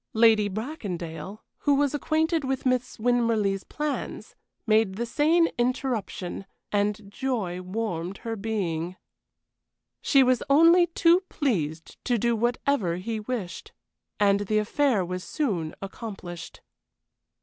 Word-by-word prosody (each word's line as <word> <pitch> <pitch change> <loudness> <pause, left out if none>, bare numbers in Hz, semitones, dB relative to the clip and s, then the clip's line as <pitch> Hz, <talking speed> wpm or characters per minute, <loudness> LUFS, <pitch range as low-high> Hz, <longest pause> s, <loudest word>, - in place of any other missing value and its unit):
Lady 220 -2 +5
Bracondale, 200 - -5 0.2
who 285 -1 +3
was 285 0 +2
acquainted 315 +2 +1
with 265 0 -2
Miss 255 -1 0
Winmarleigh's 225 -4 +1
plans, 300 -1 -4 0.3
made 215 -3 +3
the 235 +4 -2
same 315 +7 +3
interruption, 240 -7 -2 0.2
and 205 +1 +1
joy 205 -8 -2
warmed 185 -2 -3
her 225 -1 -2
being. 185 -5 -2 1.1
She 275 -2 +5
was 255 -1 +3
only 335 +5 +6
too 340 +1 +4
pleased 165 - -2
to 245 -2 +2
do 235 +2 +1
whatever 235 -4 0
he 220 +5 -3
wished. 210 -6 -5 0.5
And 200 -1 +4
the 205 +1 0
affair 215 -1 +2
was 180 +1 -4
soon 185 - -2
accomplished. 190 -4 -8
220 Hz, 115 wpm, -26 LUFS, 195-265 Hz, 1.1 s, only